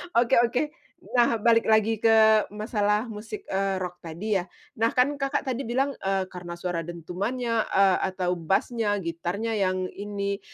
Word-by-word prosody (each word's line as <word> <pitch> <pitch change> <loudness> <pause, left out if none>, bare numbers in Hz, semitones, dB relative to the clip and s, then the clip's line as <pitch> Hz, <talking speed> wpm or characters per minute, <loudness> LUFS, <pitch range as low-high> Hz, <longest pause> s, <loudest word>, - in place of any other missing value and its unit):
Oke 235 +1 +4
oke, 240 +1 +2 0.5
nah 240 -2 +3
balik 230 +1 +3
lagi 220 0 +3
ke 220 -1 +5
masalah 210 0 0
musik, 220 - -7
eee, 195 0 0
rock 180 -1 -6
tadi 190 +5 -2
ya, 175 - -6 0.3
nah 225 - +4
kan 255 +3 +4
Kakak 275 0 -1
tadi 265 -2 -3
bilang, 265 +4 +1
eee, 195 0 0
karena 175 -1 -7
suara 175 0 -3
dentumannya, 215 +8 -2
eee, 195 -1 +4 0.2
atau 180 -1 0
bass-nya, 205 +5 0
gitarnya 175 +7 -3
yang 185 -1 0
ini, 200 -1 -4
210 Hz, 155 wpm, -26 LUFS, 185-230 Hz, 0.5 s, ke